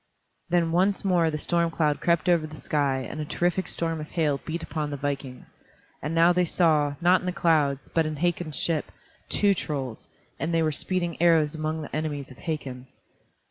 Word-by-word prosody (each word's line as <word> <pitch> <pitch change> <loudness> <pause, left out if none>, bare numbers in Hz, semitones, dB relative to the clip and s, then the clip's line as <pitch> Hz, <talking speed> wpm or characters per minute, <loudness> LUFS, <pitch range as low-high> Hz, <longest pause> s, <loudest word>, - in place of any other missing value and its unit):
Then 170 -1 +2
once 190 +4 +2
more 175 -4 +3
the 155 - -2
storm 170 +2 +1
cloud 155 -3 0
crept 170 -2 +2
over 170 -3 +3
the 155 0 -11
sky 135 -3 0
and 155 - -7
a - - -1
terrific 175 +4 0
storm 165 -2 -1
of 150 - -8
hail 150 -5 0
beat 165 +1 -3
upon 155 -2 -3
the 145 - -4
vikings, 135 -2 -5 0.4
and 150 +3 -3
now 170 +2 +6
they 180 0 +3
saw, 155 -4 +2
not 180 +2 +5
in 180 - -7
the - - +1
clouds, 150 -6 +1
but 165 -2 +1
in 155 - -3
Hakon's 165 -2 -1
ship, 160 -3 -1 0.4
two 205 -1 +3
trolls, 135 - -4 0.3
and 160 - -1
they 165 -1 +2
were 155 - +1
speeding 175 +2 -2
arrows 160 -3 +4
among 155 0 -3
the 145 - -7
enemies 145 -3 -3
of 130 - -14
Hakon. 135 -6 -5
160 Hz, 195 wpm, -26 LUFS, 145-170 Hz, 0.4 s, now